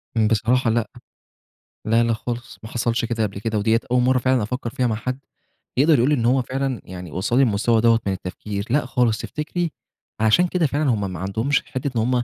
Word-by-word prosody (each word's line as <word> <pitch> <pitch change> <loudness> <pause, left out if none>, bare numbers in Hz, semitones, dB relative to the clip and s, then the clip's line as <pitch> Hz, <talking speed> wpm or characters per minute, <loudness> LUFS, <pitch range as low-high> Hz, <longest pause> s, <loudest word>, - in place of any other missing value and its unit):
بصراحة 115 +3 +2
لأ، 115 0 +1 1.0
لا، 115 +2 +3
لا 115 0 +1
خالص 120 +2 -5
ما 110 - -8
حصلش 115 -1 0
كده 115 -1 -1
قبل 100 -1 -3
كده، 110 0 -2
وديّة 110 +2 +2
أول 125 0 +4
مرة 130 +1 +3
فعلًا 130 -2 +2
أفكر 120 +2 -3
فيها 125 -1 0
مع 110 - 0
حد 125 +4 -4 0.6
يقدر 150 +3 +5
يقول 120 +4 +3
لي 150 - +4
إن 120 -4 -1
هو 130 +2 +3
فعلًا، 130 -2 -3
يعني 90 -3 -9
وصلني 120 - +2
المستوى 115 0 +2
دوّة 115 0 +4
من 100 - +1
التفكير، 100 +2 -5
لأ 140 +2 +2
خالص 125 -3 +1
تفتكري، 160 +5 -3 0.5
عشان 110 +12 +4
كده 175 -1 +1
فعلًا 145 +1 0
هُم 100 -5 -1
ما 90 - -6
عندهمش 110 +10 0
حتة 140 0 -3
إن - - +3
هُم 115 - 0
115 Hz, 205 wpm, -22 LUFS, 110-130 Hz, 1.0 s, يقدر